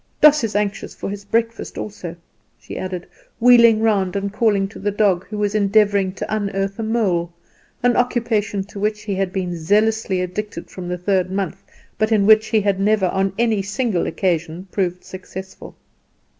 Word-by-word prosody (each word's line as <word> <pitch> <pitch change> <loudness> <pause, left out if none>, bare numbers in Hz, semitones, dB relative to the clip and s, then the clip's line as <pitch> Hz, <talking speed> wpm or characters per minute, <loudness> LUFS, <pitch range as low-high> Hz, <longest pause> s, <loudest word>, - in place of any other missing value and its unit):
Doss 300 -2 +6
is 220 -2 -2
anxious 205 -1 -2
for - - -5
his 205 0 -7
breakfast 230 +2 -1
also," 185 -5 -6 0.4
she - - -10
added, 185 -2 -4 0.3
wheeling 235 -2 +6
round 200 -5 +1
and 200 0 -2
calling 205 -3 +2
to - - -11
the 205 - -1
dog, 200 -3 +1
who 210 - -6
was 205 0 0
endeavouring 200 -2 +3
to 210 - -3
unearth 195 -1 -2
a - - -1
mole, 195 -7 0 0.5
an 245 0 +3
occupation 225 -5 0
to 205 +1 -10
which 210 +1 -1
he 210 -2 -3
had 190 -1 -1
been 180 -2 -3
zealously 205 +3 +1
addicted 180 0 -5
from 180 -1 -7
the 180 0 -2
third 185 0 0
month, 190 -2 -3 0.4
but 215 +1 +1
in 210 -3 +3
which 215 +1 +6
he 215 -1 +2
had 200 -1 0
never 205 -2 +2
on 195 +1 0
any 225 -3 +2
single 205 -2 -1
occasion 170 0 -2
proved 180 -2 -1
successful. 190 0 -9
200 Hz, 175 wpm, -20 LUFS, 190-215 Hz, 0.5 s, Doss